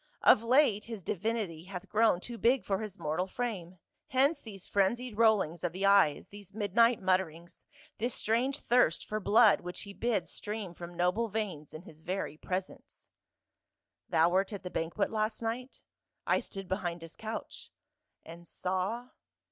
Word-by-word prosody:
Of - - +7
late 230 -3 +3
his 225 -5 -7
divinity 195 -4 -2
hath 185 -2 -7
grown 220 -4 +3
too 235 +2 -8
big 245 +2 +3
for 195 -1 0
his 210 -2 -6
mortal 160 +4 -1
frame, 190 -6 -4 0.3
hence 275 +5 +2
these 200 -5 -10
frenzied 225 +4 0
rollings 205 -7 +3
of 175 -2 -1
the 190 +2 -1
eyes, 200 -7 +4
these 205 -1 -13
midnight 230 +3 +3
mutterings, 180 -3 -1 0.3
this 235 +2 -1
strange 255 +6 0
thirst 240 -9 +3
for 215 - -3
blood 215 +1 +5
which 180 0 -6
he 200 - -8
bids 215 -5 -1
stream 210 -4 -5
from 175 0 -9
noble 180 +6 +1
veins 195 -9 -4
in 155 +2 -9
his 155 -3 -14
very 180 -3 -3
presence." 185 +4 -6 0.4
" - - -58
Thou 160 +1 +4
wert 190 +3 +1
at 200 -2 -6
the 180 - -6
banquet 170 +5 -1
last 215 0 -1
night?" 245 +3 -4 0.2
" - - -57
I - - +3
stood 195 -1 -7
behind 175 -3 -3
his 165 - -11
couch." 220 0 -7 0.6
"And 170 +1 -11
saw?" 190 +9 -2
200 Hz, 165 wpm, -31 LUFS, 180-225 Hz, 0.6 s, Of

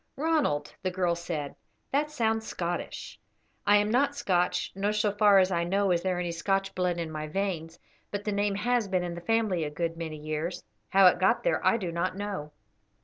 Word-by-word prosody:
"Ronald," 285 - 0
the 185 - 0
girl 180 -1 0
said, 165 -4 -4 0.4
"that 295 +2 +1
sounds 225 -5 0
Scottish." 175 0 -4 0.5
"I 205 0 +7
am 210 +1 +1
not 280 +4 +2
Scotch, 180 -9 0
nor 200 +2 0
so 210 -1 +1
far 205 -1 +5
as 190 0 +4
I 170 -1 +1
know 195 +2 +1
is 170 -1 +2
there 185 -1 -1
any 175 -1 -2
Scotch 195 +3 -1
blood 180 -1 0
in 165 -2 -3
my 155 0 -4
veins, 170 -2 -3 0.3
but 205 0 -4
the 210 - -1
name 205 0 0
has 235 +1 +1
been 185 -2 0
in 175 -1 -3
the 175 - -7
family 215 -4 +1
a 150 - -2
good 165 +2 -3
many 160 -2 -5
years; 155 +3 -4 0.3
how 195 0 +6
it 180 -1 +6
got 185 - +3
there - - +1
I 230 - +4
do 185 -6 -3
not 170 +2 -2
know." 200 -7 -4
185 Hz, 205 wpm, -28 LUFS, 170-205 Hz, 0.5 s, I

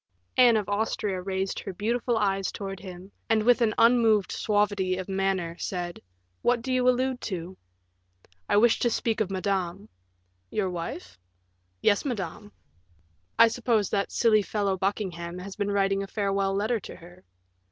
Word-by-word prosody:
Anne 240 -3 +6
of 210 - -2
Austria 205 -2 -1
raised 190 0 -2
her 195 - -6
beautiful 235 +4 0
eyes 195 -2 0
towards 195 -2 -6
him, 185 0 -10 0.2
and 220 -1 +3
with 245 +2 +4
an 220 -2 +2
unmoved 230 -4 +4
suavity 205 -3 0
of 185 - -5
manner, 190 -3 -1
said, 175 -2 -4 0.4
"What 240 -1 +1
do 260 - -2
you 255 0 +3
allude 255 0 0
to?" 185 -2 -5 0.9
"I - - +4
wish 230 +2 +4
to 240 - +2
speak 225 -1 -1
of 205 - 0
Madame." 190 0 -2 0.6
"Your 190 -3 -1
wife?" 170 - -6 0.6
"Yes, 205 -1 +3
madame." 205 - -5 0.9
"I 230 - +8
suppose 225 -3 0
that 200 -1 0
silly 220 -3 +4
fellow 200 -1 -1
Buckingham 180 -3 -3
has 190 +1 -8
been 205 -1 -2
writing 195 -1 +1
a 195 - -5
farewell 195 -1 0
letter 220 +4 0
to - - -10
her." 175 +1 -15
200 Hz, 155 wpm, -27 LUFS, 190-225 Hz, 0.9 s, I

